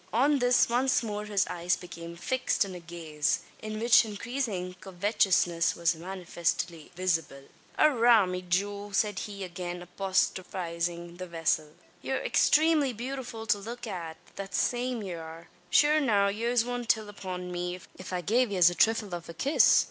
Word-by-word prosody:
On 280 +5 +3
this 245 0 +4
once 250 +2 +2
more 210 -1 -4
his 205 -2 +1
eyes 175 0 0
became 170 -1 -9
fixed 260 +3 0
in 190 - -7
a 180 - -7
gaze, 165 -3 -2 0.2
in 215 0 -5
which 235 +1 +6
increasing 215 -4 -3
covetousness 185 -3 +1
was 170 0 +2
manifestly 170 -2 -3
visible. 165 -6 -1 0.3
"Arrah, 240 -7 +5
me 180 0 -3
jewel!" 200 +3 -2
said 205 0 +1
he, 200 -2 -6
again 175 -1 -5
apostrophising 175 -2 -2
the 185 0 -6
vessel, 160 -2 -1 0.3
"ye're - - -1
extramely 305 -4 +3
bewtifull 245 -1 -5
to 205 - +3
look 235 +4 -7
at 170 -6 -6 0.2
that 195 -1 -5
same 245 -2 0
ye 190 -3 -5
arr. 165 0 -9 0.2
Shure 300 +9 +5
now, 205 -8 +3
yez 230 +3 +1
wudn't 245 -1 -4
till 220 -2 +2
upon 185 -3 -6
me, 180 0 -3 0.2
if 185 - -9
I 180 -1 -1
gave 235 +7 +2
yez 180 -3 +5
a - - -3
thrifle 215 0 +2
av 170 -1 -6
a 170 - -8
kiss? 280 - +5
195 Hz, 160 wpm, -29 LUFS, 175-230 Hz, 0.3 s, which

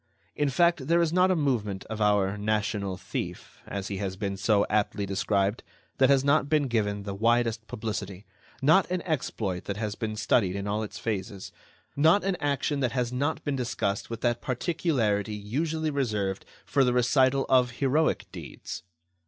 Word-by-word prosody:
In 145 -1 +1
fact, 170 0 +2
there 170 +1 +4
is 170 -1 +1
not 185 +1 +4
a 185 - +3
movement 115 - -1
of 110 0 -6
our 105 -1 +3
"national 105 -2 -1
thief," - - -6
as 100 -1 -4
he 100 - -3
has 95 -1 -3
been 100 0 -3
so 100 +1 +2
aptly 105 -1 0
described, 100 +2 0 0.4
that 130 0 +5
has 135 -1 +4
not 140 0 +3
been 150 -2 +2
given 105 -4 -1
the 100 -1 -4
widest 115 +1 +1
publicity, 105 -3 -5 0.4
not 160 +7 +5
an 180 -1 -2
exploit 110 - -2
that 100 - -4
has 105 -1 -2
not - - -16
been 110 -2 -2
studied 100 -3 +2
in 100 0 -3
all 105 +1 -1
its 110 - -6
phases, 100 -2 -4 0.4
not 160 +7 +4
an 195 -1 0
action 145 0 -1
that 125 -4 0
has 125 -1 -1
not 145 +5 -1
been 145 -2 -1
discussed 115 -6 -2
with 115 -1 -6
that 120 -1 0
particularity 125 - 0
usually 155 +10 -2
reserved 105 -9 -2 0.2
for 140 - +2
the 125 -1 +2
recital 130 +2 +3
of 125 -1 +4
heroic 145 +5 +1
deeds. - - -8
115 Hz, 175 wpm, -27 LUFS, 100-140 Hz, 0.4 s, that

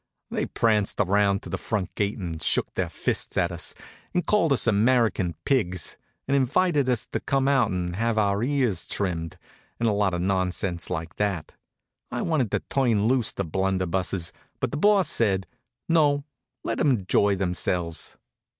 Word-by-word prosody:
They - - -1
pranced 105 -3 +1
around 100 0 +2
to - - -8
the 95 - -2
front 105 -5 -2
gate 100 +1 -1
and 85 -6 -5
shook - - 0
their - - -1
fists - - -2
at 85 -1 +2
us, 85 0 -4 0.4
and 180 - +1
called 190 -8 +2
us 135 - +3
American 110 -5 +2
pigs, 95 - 0 0.3
and 140 - +2
invited 140 +1 +2
us 125 -3 +1
to - - -1
come 135 0 0
out 135 -5 +3
and 90 -1 -2
have 115 0 0
our 100 -1 +2
ears 125 - 0
trimmed, 85 -5 -2 0.4
and 115 - +1
a - - +3
lot 100 -3 +1
of 85 - -2
nonsense 95 -2 -1
like 80 -2 -4
that. 100 -6 -1 0.6
I - - -3
wanted 145 -9 +1
to - - -1
turn 115 -6 +1
loose 125 -1 +2
the 100 - -3
blunderbusses, 95 0 -1 0.3
but - - -1
the 145 - -2
Boss 200 +1 +4
said: 95 -8 +1 0.4
"No, 145 -4 +3 0.4
let - - -2
'em 150 - +3
enjoy 100 -3 +2
themselves." 90 -2 -2
100 Hz, 170 wpm, -25 LUFS, 90-130 Hz, 0.6 s, Boss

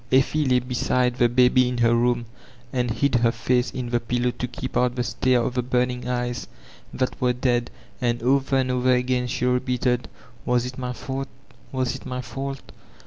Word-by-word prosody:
Eflfe 135 +2 +3
by 125 - +5
beside 125 0 0
the 120 -2 +4
baby 125 +1 +4
in 125 - -3
her 115 -1 +4
room, 120 0 +2 0.5
and 125 -2 0
hid 140 +5 +1
her 120 -1 +4
face 125 +2 0
io 125 - -2
the 120 0 +1
pillow 120 +1 0
to 125 - -4
keep 125 +2 -6
out 125 0 +2
the 125 - 0
stare 120 +1 +1
of 120 - -2
the 125 - +1
burning 125 0 -1
eyes 125 -1 -2 0.4
that 130 -1 -2
were 125 -1 +3
dead; 120 -1 0 0.3
and 120 -1 0
over 135 +2 +2
and 130 -1 +1
over 125 0 +3
agab 125 0 0
she 125 - -1
repeated, 125 -1 +1 0.4
*'Was 125 0 +1
it 125 +1 -6
my 125 -1 -3
fault, 135 +2 -4 0.4
was 130 -2 -1
it 135 - -9
my 125 0 -3
fault?" 135 +3 -6
125 Hz, 195 wpm, -24 LUFS, 120-130 Hz, 0.5 s, by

